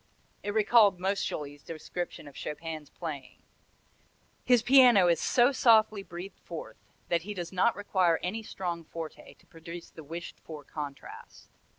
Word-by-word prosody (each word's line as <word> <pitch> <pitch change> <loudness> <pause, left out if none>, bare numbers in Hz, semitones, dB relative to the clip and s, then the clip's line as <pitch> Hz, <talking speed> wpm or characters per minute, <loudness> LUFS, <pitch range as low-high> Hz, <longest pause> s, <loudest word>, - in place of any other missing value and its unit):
It 205 +1 -4
recalled 210 -3 +5
Moscheles' 150 -7 -2
description 165 0 -6
of 145 - -12
Chopin's 155 -1 -6
playing: 145 -6 -8 1.0
"His 245 -2 +4
piano 245 -7 +7
is 170 -2 +2
so 245 +2 +4
softly 220 -5 +4
breathed 185 +1 -9
forth 165 -2 -8 0.3
that 170 -1 +2
he 205 +4 -6
does 175 -2 -5
not 190 +5 +2
require 185 -4 +2
any 205 +5 -2
strong 175 -5 -4
forte 165 0 -9
to - - -26
produce 170 -1 -10
the 160 - -11
wished 165 +4 -8
for 155 -2 -10
contrast." 145 -1 -9
175 Hz, 145 wpm, -29 LUFS, 160-205 Hz, 1.0 s, piano